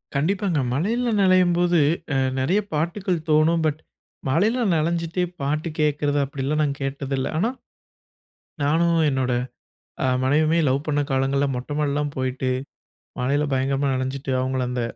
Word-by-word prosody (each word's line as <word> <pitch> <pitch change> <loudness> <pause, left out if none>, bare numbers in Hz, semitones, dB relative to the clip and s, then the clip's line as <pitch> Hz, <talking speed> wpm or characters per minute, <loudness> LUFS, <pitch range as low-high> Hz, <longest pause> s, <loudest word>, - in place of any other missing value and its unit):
கண்டிப்பாங்க, 175 +2 +1
மழையில 230 - 0
நனையும்போது 175 -2 +4 0.3
அ - - 0 0.2
நெறைய 175 +11 +2
பாட்டுக்கள் 175 +3 -1
தோனும். 155 +2 +4
பட், 155 0 0 0.5
மழையில 215 - +2
நனஞ்சிட்டே 170 +2 0 0.2
பாட்டு 150 +4 -1
கேக்குறது 145 -1 +1
அப்படிலாம் 140 +2 -2
நான் 140 -1 -2
கேட்டது 135 0 -3
இல்ல. 130 - -1
ஆனா 210 +8 +2 1.1
நானும் 165 +3 +2
என்னோட 130 -2 0 0.7
அ - - +2 0.2
மனைவியுமே 155 +5 +3
லவ் 135 +3 0
பண்ண 145 -1 +1
காலங்கள்ல 135 +1 +1
மொட்டைமாடிலாம் 145 +2 -1
போயிட்டு, 130 0 -1 0.7
மழையில 140 +4 +1
பயங்கரமா 135 +1 0
நனைஞ்சிட்டு, 130 +1 -3
அவங்கள 130 0 -1
அந்த 125 -1 -2
150 Hz, 125 wpm, -23 LUFS, 135-170 Hz, 1.1 s, நனையும்போது